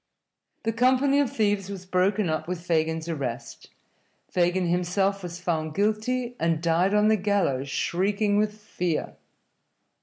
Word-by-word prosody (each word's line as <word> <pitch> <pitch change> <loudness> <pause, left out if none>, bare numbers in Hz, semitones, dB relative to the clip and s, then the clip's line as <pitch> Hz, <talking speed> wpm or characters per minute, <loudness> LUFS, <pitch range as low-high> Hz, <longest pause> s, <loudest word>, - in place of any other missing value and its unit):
The 225 0 0
company 260 +4 +3
of 285 -4 +1
thieves 205 -3 0
was 190 -2 -7
broken 190 +2 +1
up 155 0 -2
with 180 -1 -5
Fagin's 160 -1 0
arrest. 140 -8 -5 0.6
Fagin 180 +1 +1
himself 180 +3 0
was 175 -1 -7
found 160 -3 -2
guilty, 225 +5 0
and 165 -1 +1
died 170 +4 +2
on 210 0 +4
the 220 - +5
gallows 185 -10 0
shrieking 205 +7 +1
with 210 0 0
fear. 180 -6 -3
185 Hz, 140 wpm, -26 LUFS, 170-210 Hz, 0.6 s, the